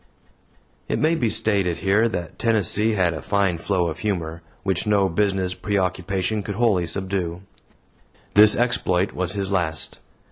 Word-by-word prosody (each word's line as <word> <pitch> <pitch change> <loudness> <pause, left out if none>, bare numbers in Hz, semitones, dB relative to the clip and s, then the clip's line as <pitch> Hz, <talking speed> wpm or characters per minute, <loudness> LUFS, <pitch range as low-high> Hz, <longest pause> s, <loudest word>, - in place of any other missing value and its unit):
It - - 0
may 155 +2 +2
be 125 -9 0
stated 100 -6 +1
here 105 +4 +2
that 85 -6 -6
Tennessee 110 -1 +2
had 90 -5 +1
a 75 - -6
fine 100 -3 0
flow 90 -1 0
of 80 -1 -5
humor, 85 -6 -3 0.2
which 95 0 -1
no 100 -2 +3
business 95 0 0
preoccupation 95 +1 -1
could 100 0 -5
wholly 100 -7 +1
subdue. 95 -2 -3 0.9
This 105 +1 +8
exploit 95 -6 +1
was 90 0 -1
his 100 -1 -3
last. 85 -5 -2
95 Hz, 145 wpm, -22 LUFS, 90-105 Hz, 0.9 s, This